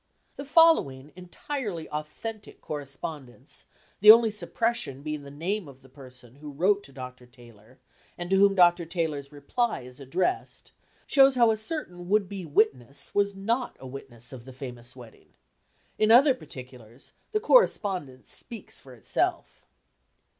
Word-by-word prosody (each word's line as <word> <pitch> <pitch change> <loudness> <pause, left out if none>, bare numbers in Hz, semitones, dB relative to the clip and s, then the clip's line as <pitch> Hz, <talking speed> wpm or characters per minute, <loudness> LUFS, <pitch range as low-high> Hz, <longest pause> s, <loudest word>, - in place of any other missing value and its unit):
The 280 - -7
following 210 - +3
entirely 185 - -5
authentic 205 +9 -7
correspondence, 140 -2 -7 0.3
the 210 - +6
only 225 0 +9
suppression 210 - -2
being 150 -1 -4
the 140 - -11
name 175 +6 -3
of 135 -1 -15
the 135 - -18
person 130 -2 -15
who 150 0 -9
wrote 190 +8 +2
to - - -15
Dr. 125 -2 -10
Taylor 120 -1 -18 0.4
and 175 - -5
to - - +5
whom 200 0 +5
Dr. 175 -2 +4
Taylor's 155 -5 -3
reply 150 - -2
is 125 +1 -12
addressed, 175 - -3 0.3
shows 270 -2 +5
how 235 -2 +5
a - - +1
certain 215 - -5
would 205 -1 +2
be 190 -2 -7
"witness" 140 - 0
was 200 -1 +1
not 230 +6 -2
a - - -11
witness 130 -2 -10
of 120 -2 -10
the 130 - -11
famous 125 -1 -9
wedding. 120 -3 -15 0.7
In 215 - +3
other 260 +5 +7
particulars, 125 - -12 0.2
the 430 - +1
correspondence 195 - +2
speaks 230 -4 -8
for 130 -2 -14
itself. 110 - -3
155 Hz, 145 wpm, -27 LUFS, 130-215 Hz, 0.7 s, only